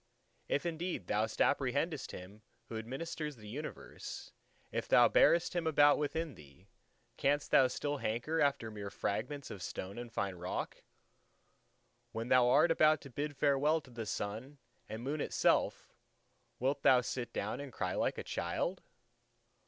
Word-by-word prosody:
If 145 - 0
indeed 170 - -3
thou 105 +3 +1
apprehendest 140 +7 0
Him 95 +4 -10 0.3
who 115 - -4
administers 150 +5 -5
the 105 -3 -13
universe, 145 +8 -7 0.4
if - - -2
thou - - +7
bearest 170 +1 +4
Him 170 -2 0
about 145 -2 +5
within 155 +1 -2
thee, 85 - -17 0.5
canst 145 +1 +1
thou 130 - +7
still 145 +3 -2
hanker 130 +8 -1
after 140 -6 +1
mere 105 -2 -6
fragments 125 +8 -3
of 95 - -7
stone 95 +4 -5
and 120 -1 -7
fine 100 -4 -1
rock? 90 0 -4 1.3
When 115 +2 -4
thou 125 -1 +5
art 165 +6 +5
about 155 -1 +5
to 140 - -11
bid 145 +2 -4
farewell 145 +3 +3
to 130 - -17
the 115 -2 -6
Sun 110 +9 -4 0.3
and 110 +2 -6
Moon 145 +3 -2
itself, - - +1 0.7
wilt 135 +3 0
thou 125 -1 +6
sit 125 0 -4
down 105 +5 -3
and 140 -2 -7
cry - - -2
like - - 0
a - - -4
child? - - -2
130 Hz, 150 wpm, -34 LUFS, 110-150 Hz, 1.3 s, thou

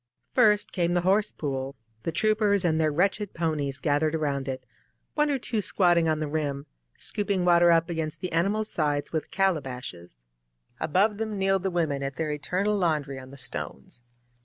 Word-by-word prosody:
First 210 -4 +4
came 175 -2 0
the 175 - +3
horse 200 +3 +3
pool, 135 -2 -4 0.3
the 165 - -2
troopers 205 +2 +2
and 160 -1 +2
their 155 -1 +2
wretched 195 +5 0
ponie6 150 -5 -1
gathered 150 +1 +2
around 140 -3 -1
it; 130 -1 -4 0.5
one 300 0 +2
or 280 - +1
two 230 -3 -2
squatting 175 -4 +3
on 155 -1 +1
the 155 - -2
rim, 145 -2 -2 0.3
scooping 200 -3 -1
water 175 -1 +6
up 165 0 +4
against 160 -3 -3
the 185 - -4
animals' 200 +6 +1
sides 145 -2 0
with 160 - -2
calabashes. 130 - -2
• - - -26
• - - -32
• - - -31 0.6
Above 200 +6 +2
them 220 -2 -2
kneeled 195 0 +2
the 190 - 0
women 160 -6 0
at 135 0 -3
their 160 -2 -2
eternal 180 +8 0
laundry 150 -7 0
on 130 0 -11
the 140 - -12
stones. 125 -1 -5
165 Hz, 185 wpm, -27 LUFS, 145-195 Hz, 0.6 s, water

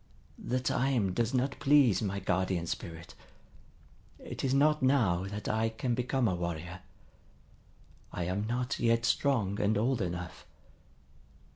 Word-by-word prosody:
The 130 +2 -1
time 125 -6 0
does 115 +3 0
not 130 +1 -1
please 135 -9 +4
my 100 -2 -2
Guardian 95 -2 -1
Spirit. 85 0 -6 1.0
It - - -7
is 135 - +1
not 150 +2 +3
now 115 -10 +2
that 105 +2 -6
I 110 +1 +1
can 120 +2 -2
become 125 0 0
a 95 - +1
warrior. 85 0 -4 1.3
I 90 - -3
am 95 +5 -2
not 125 +3 -2
yet 115 0 +2
strong 110 -7 +1
and 105 +1 +2
old 120 +2 +1
enough. 90 -2 -5
110 Hz, 135 wpm, -30 LUFS, 95-125 Hz, 1.3 s, please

